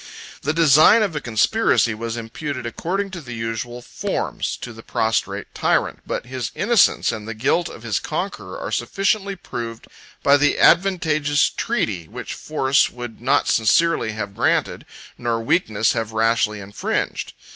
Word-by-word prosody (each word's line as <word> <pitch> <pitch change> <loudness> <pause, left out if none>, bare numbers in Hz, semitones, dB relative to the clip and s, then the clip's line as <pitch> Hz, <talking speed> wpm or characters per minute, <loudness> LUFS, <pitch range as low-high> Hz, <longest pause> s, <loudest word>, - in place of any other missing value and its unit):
The 145 - 0
design 160 +7 +6
of 195 -6 -2
a 150 - -2
conspiracy 120 - +2
was 115 +1 -4
imputed, 130 +3 -5
according 190 +11 -3
to 175 -2 -7
the 120 -4 -8
usual 115 +2 -4
forms, - - -3
to 120 - -8
the 115 - -11
prostrate 110 0 -1
tyrant; - - 0
but - - -3
his 125 -2 -4
innocence, 225 -1 +3
and 110 -1 -6
the 115 - -5
guilt 145 +9 +1
of 115 - -11
his 110 -4 -1
conqueror, - - -4
22 - - -6
are - - -4
sufficiently 200 0 0
proved 115 -9 -7 0.4
by 140 +1 +6
the 145 +1 +2
advantageous 155 -5 +3
treaty 105 - -2
which - - -7
force 135 -3 +1
would 120 -2 -8
not 130 +3 +2
sincerely 115 +1 +2
have 100 -2 -5
granted, - - 0 0.3
nor 120 -1 -1
weakness 110 - +1
have 115 -1 -3
rashly 110 -1 +1
infringed. 100 +1 -3
120 Hz, 155 wpm, -21 LUFS, 115-160 Hz, 0.4 s, design